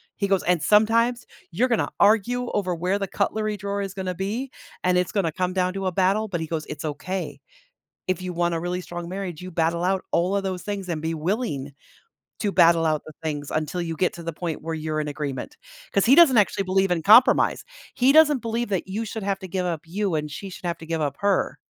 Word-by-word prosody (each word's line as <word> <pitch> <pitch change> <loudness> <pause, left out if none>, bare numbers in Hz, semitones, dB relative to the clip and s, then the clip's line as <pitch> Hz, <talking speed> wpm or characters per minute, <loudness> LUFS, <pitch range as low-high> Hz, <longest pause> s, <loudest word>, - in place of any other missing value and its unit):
He 200 - -1
goes, 195 -1 +2
"And 175 -3 +2
sometimes, 230 +4 +3 0.3
you're 235 +10 +2
gonna 230 - +1
argue 230 +4 +3
over 185 -4 0
where 180 +4 0
the 195 - -2
cutlery 215 +2 -1
drawer 200 0 -3
is 195 -1 -5
gonna 185 -2 -4
be, 220 +8 -3 0.3
and 180 0 +3
it's 180 - 0
gonna 185 -6 +1
come 180 +2 -2
down 185 -1 0
to 195 -1 -4
a - - 0
battle," 195 +4 +2
but 175 -4 -3
he 160 - -4
goes, 160 -1 -3
"It's 150 +1 -6
okay, 185 +5 -4 0.7
if 185 0 0
you 180 -1 -4
want 170 0 0
a - - -1
really 180 +1 -3
strong 175 -1 -7
marriage, 185 -3 -5
you 185 0 -8
battle 165 +1 0
out 190 0 +1
all 180 +4 +1
of 200 - 0
those 185 -2 -3
things 200 -3 -4
and 155 -2 -2
be 165 +1 -2
willing 155 - -2 0.7
to 205 - 0
battle 170 -2 +5
out 155 -1 +1
the 155 - -9
things 145 -2 -4
until 155 +3 -2
you 165 -1 -4
get 180 - +1
to 170 - -8
the 165 0 -4
point 165 -1 -4
where 165 0 -3
you're 155 0 -2
in 150 - -3
agreement." 145 - -5 0.4
'Cause 200 - +2
he 265 - +7
doesn't 290 -9 +7
actually 195 -1 +2
believe 190 0 +1
in 165 -2 0
compromise. 225 +5 +5 0.3
He 260 +2 +4
doesn't 300 -5 +5
believe 230 0 -2
that 190 -1 -1
you 215 +4 -3
should 220 0 -5
have 195 -1 -1
to 190 - -8
give 185 0 -2
up 165 -3 -3
you 195 0 -1
and 150 0 -3
she 195 +5 -7
should 180 - -8
have 170 -1 -2
to 160 - -11
give 165 -1 -2
up 140 -1 -2
her. 200 -1 +1
185 Hz, 240 wpm, -24 LUFS, 165-200 Hz, 0.7 s, he